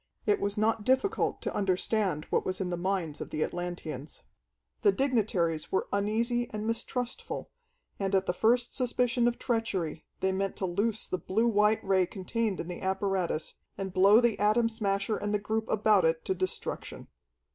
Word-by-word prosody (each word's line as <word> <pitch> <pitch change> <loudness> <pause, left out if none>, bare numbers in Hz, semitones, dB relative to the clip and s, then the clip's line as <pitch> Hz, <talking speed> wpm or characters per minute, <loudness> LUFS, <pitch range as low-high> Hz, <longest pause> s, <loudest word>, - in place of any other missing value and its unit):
It 415 -1 +2
was 200 +1 -1
not 215 0 +1
difficult 265 - +1
to - - -2
understand 190 -4 0
what - - +2
was 185 0 -2
in 185 -2 -2
the - - 0
minds 175 -4 -2
of - - -5
the 155 - -1
Atlanteans. 175 -5 -5 0.6
The 205 - +5
dignitaries 195 - 0
were 190 - 0
uneasy 230 +4 0
and 215 0 -4
mistrustful, 240 +2 -3 0.5
and 195 0 0
at 190 0 +2
the 180 - 0
first 240 +5 +2
suspicion 245 -1 +1
of 240 - 0
treachery 195 -10 -2
they 190 - +1
meant 195 0 -1
to 190 - -2
loose 205 +5 0
the 185 - -2
blue 220 +7 0
white 210 -1 +3
Ray 190 -2 +3
contained 205 +2 -2
in 170 - -4
the 180 - -6
apparatus, 190 -4 -1 0.2
and 190 -1 -4
blow 195 +4 +7
the 235 -3 +2
Atom 215 +3 +3
Smasher 210 -1 -1
and 205 0 -1
the - - +4
group 220 +2 -2
about 210 -2 +4
it 160 0 +1
to - - +1
destruction. 185 0 -4
200 Hz, 175 wpm, -29 LUFS, 185-225 Hz, 0.6 s, blow